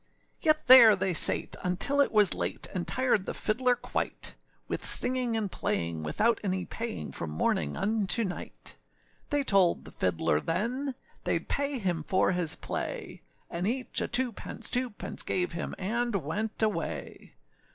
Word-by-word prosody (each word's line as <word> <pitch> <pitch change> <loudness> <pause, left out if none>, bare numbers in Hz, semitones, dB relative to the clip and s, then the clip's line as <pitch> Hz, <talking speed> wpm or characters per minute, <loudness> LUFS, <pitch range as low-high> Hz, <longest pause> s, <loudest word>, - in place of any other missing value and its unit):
Yet 310 -2 +2
there 240 -4 +10
they 190 -1 -1
sate, - - +4
until 195 +11 +1
it 280 - +2
was 210 -4 +6
late, - - -3
And 180 -3 -3
tired 250 -7 +1
the - - -4
fiddler 245 +3 +1
quite, - - -3 0.3
With - - -4
singing 250 -2 +2
and 205 -4 -2
playing, 85 -1 -2
without 215 - +1
any 185 -2 -2
paying, 230 -1 -5
From 85 - -5
morning 75 -1 -1
unto 215 +1 +1
night: - - -6 0.5
They 290 -1 +1
told 195 -8 +3
the - - -10
fiddler 80 -4 0
then, 250 +10 -2 0.3
Theyâd - - -1
pay 280 -1 -1
him 180 -7 -1
for 185 +5 +1
his 180 -3 0
play; - - -5 0.3
And 175 +3 -3
each 250 +2 -2
a - - -1
two 245 0 +1
pence, - - -3
two 250 0 0
pence, 205 - -6
Gave 180 -1 -1
him, 170 0 -5
and 235 +4 -1
went 205 +7 -2
away. 165 - -4
205 Hz, 160 wpm, -29 LUFS, 175-245 Hz, 0.5 s, there